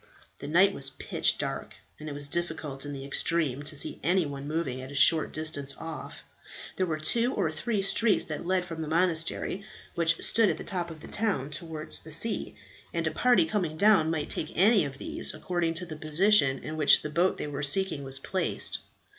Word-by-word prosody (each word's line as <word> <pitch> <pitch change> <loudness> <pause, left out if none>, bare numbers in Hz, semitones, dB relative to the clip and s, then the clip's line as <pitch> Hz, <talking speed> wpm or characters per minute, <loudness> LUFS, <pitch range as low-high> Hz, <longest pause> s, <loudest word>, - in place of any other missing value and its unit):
The - - -7
night 190 +6 +4
was 135 -5 0
pitch - - -1
dark, - - -5 0.2
and 155 0 -7
it - - -5
was 145 0 -1
difficult 155 -4 -4
in - - -5
the 135 -1 -7
extreme 145 -1 0
to 145 +2 -5
see - - -3
any 175 +3 +2
one 140 -1 -6
moving 150 -5 -3
at 130 +1 -9
a - - -8
short 160 +3 +4
distance 145 -3 -4
off. 165 -1 -8 0.5
There 185 - 0
were 155 -2 -2
two 235 - +1
or - - 0
three 215 -5 -2
streets 215 +2 +3
that 155 0 -5
led 185 -1 +1
from 165 -2 -6
the 155 - -4
monastery, 170 +3 0 0.3
which 170 -1 +1
stood 225 -1 +3
at - - -1
the - - -7
top 175 -3 -3
of 160 -2 -10
the - - -10
town, 190 -11 -1
towards 155 0 -4
the 160 - -11
sea; 165 +9 -3 0.4
and 165 -1 -2
a 160 - 0
party 240 0 +3
coming 160 -3 -2
down 200 -5 +5
might 155 -2 -2
take 155 - -1
any 200 0 +5
of 135 -1 -7
these, - - +3
according 175 -2 -2
to 180 +2 -1
the 160 -2 -8
position 155 -3 +3
in 155 +1 -6
which 150 -2 +5
the 150 - -4
boat 175 +4 +1
they - - -4
were 145 -1 -5
seeking 150 0 +3
was 135 0 -1
placed. 190 +6 0
160 Hz, 210 wpm, -28 LUFS, 145-185 Hz, 0.5 s, down